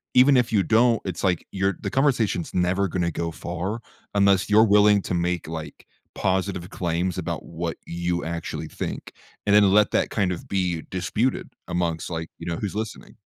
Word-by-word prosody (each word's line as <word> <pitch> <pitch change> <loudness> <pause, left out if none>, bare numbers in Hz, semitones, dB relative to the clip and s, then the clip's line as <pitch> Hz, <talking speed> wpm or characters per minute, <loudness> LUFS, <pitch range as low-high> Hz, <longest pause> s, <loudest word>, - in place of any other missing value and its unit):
even 130 +1 +7
if 120 -2 +2
you 100 -3 +3
don't, 115 +1 +3
it's 90 -1 -4
like 90 -3 +1
you're 95 -1 0
the - - -2
conversation's 120 - +1
never 90 +2 +1
going 90 +1 -2
to 85 - 0
go 85 +1 -3
far 90 +7 -4 0.4
unless 100 -1 +3
you're 105 +1 +6
willing 105 -1 +5
to - - -4
make 85 0 0
like 80 -2 -7 0.3
positive 95 -1 -1
claims 90 0 -2
about - - -3
what - - -4
you 85 0 -2
actually 85 0 -4
think - - -5 0.3
and 100 - +3
then 100 -2 +6
let 105 +1 +4
that - - +1
kind 100 -4 0
of 85 - -6
be 90 -4 -1
disputed 105 +7 -1 0.2
amongst 85 -2 -1
like, 80 -1 -4
you - - -7
know, 85 - -1
who's 100 -1 -4
listening. 110 0 -5
95 Hz, 185 wpm, -24 LUFS, 85-105 Hz, 0.4 s, even